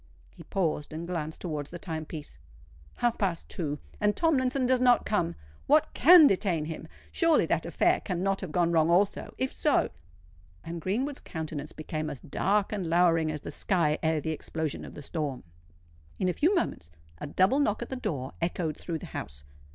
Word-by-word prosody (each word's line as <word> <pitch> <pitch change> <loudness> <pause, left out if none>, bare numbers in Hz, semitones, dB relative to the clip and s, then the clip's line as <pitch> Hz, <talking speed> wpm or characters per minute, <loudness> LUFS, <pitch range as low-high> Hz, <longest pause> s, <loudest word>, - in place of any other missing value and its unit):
He - - -15
paused 155 -4 -2
and 160 +2 -5
glanced 160 -3 -4
towards 150 -5 -4
the 175 - -7
time 160 -3 -5
piece. 150 - -9 0.6
"Half 240 -1 0
past 185 -5 -1
two; 150 -4 -3 0.2
and 210 -1 +2
Tomlinson 270 -5 +2
does 255 0 +3
not 245 -1 +4
come! 170 -5 0 0.3
What 300 +2 +4
can 335 +3 +8
detain 185 - +2
him? 160 0 -6 0.2
Surely 330 -2 +3
that - - 0
affair - - +2
cannot 195 +1 -1
have 185 -5 -5
gone 170 +1 +2
wrong 160 -1 +3
also? 190 +4 +1
If 260 0 -1
so——" 300 - +2 0.7
And 165 0 -6
Greenwood's 255 - -1
countenance 155 -3 -5
became 155 0 -4
as 145 -3 -6
dark 200 - 0
and 195 -5 -2
lowering 165 -2 +3
as 150 -2 -5
the - - -6
sky 165 -6 +1
ere 160 -1 +1
the 160 - -2
explosion 160 -1 -4
of - - -11
the 145 - -8
storm. 145 -5 -3 0.7
In 185 - 0
a 180 - +1
few 345 - +2
moments 85 - -2 0.3
a - - -5
double 190 - +3
knock 230 -5 +1
at - - -9
the 265 - -3
door 140 - -4
echoed 165 -2 -1
through 170 -2 -4
the - - -9
house. 70 0 -6
170 Hz, 185 wpm, -28 LUFS, 155-210 Hz, 0.7 s, can